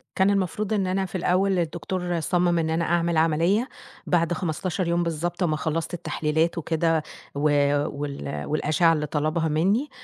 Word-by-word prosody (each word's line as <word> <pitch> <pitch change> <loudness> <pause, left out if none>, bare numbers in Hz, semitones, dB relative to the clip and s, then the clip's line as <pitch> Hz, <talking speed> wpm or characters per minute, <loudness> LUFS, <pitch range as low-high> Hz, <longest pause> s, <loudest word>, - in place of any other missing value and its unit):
كان 190 +1 +3
المفروض 200 +2 0
إن 195 -3 +1
أنا 190 +1 0
في 190 - -9
الأول، 185 +2 +2
الدكتور 175 +1 -2
صَمَّم 175 +1 +1
إن 160 -1 0
أنا 165 +1 0
أعمل 170 0 +1
عملية 165 +9 +2 0.4
بعد 170 -1 +2
15 175 +2 -2
يوم 170 +1 +1
بالضبط، 170 +2 -2
أمّا 155 -3 +1
خلّصت 160 +3 -2
التحليلات 160 0 -1
وكده، 165 0 0 0.3
و 140 - -3 0.5
وال 105 - -5
والأشِعة 155 +2 +2
اللي 150 -1 -1
طلبها 155 +2 0
مِنِّي، 195 - +1
170 Hz, 155 wpm, -25 LUFS, 155-180 Hz, 0.5 s, كان